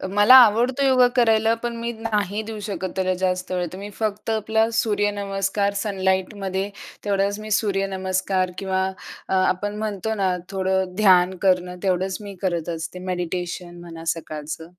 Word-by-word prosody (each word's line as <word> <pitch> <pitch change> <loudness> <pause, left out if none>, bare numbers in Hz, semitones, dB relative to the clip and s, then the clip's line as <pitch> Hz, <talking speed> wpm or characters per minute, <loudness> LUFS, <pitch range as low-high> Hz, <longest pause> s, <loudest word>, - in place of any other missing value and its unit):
मला 205 +5 +8
आवडतो 245 +3 +6
योगा 255 -1 +5
करायला 225 -2 +4
पण 240 -1 -2
मी 235 +1 -3 0.2
नाही 210 -1 -1
देऊ 215 -1 -6
शकत 190 -2 -3
त्याला 185 -1 +1
जास्त 185 0 -1
वेळ 180 -1 0
तर 185 - -7
मी 200 +1 -7
फक्त 215 0 -2
आपला 220 0 +1
सूर्यनमस्कार 200 -1 0
सनलाईटमध्ये 190 -1 -1 0.4
तेवढाच 200 0 0
मी 215 0 -8
सूर्यनमस्कार 190 -2 0
किंवा 190 -1 0 0.4
अ, - - 0
आपण 190 +2 +1
म्हणतो 215 0 -2
ना 190 -3 +1
थोडं 190 -1 -1
ध्यान 185 -3 +5
करणं 180 -2 +2
तेवढंच 190 0 0
मी 200 -1 -8
करत 175 -3 -1
असते. 165 +3 -6
मेडिटेशन 175 -1 -4
म्हणा 165 -1 -10
सकाळचं. 155 0 -7
195 Hz, 145 wpm, -23 LUFS, 185-210 Hz, 0.4 s, मला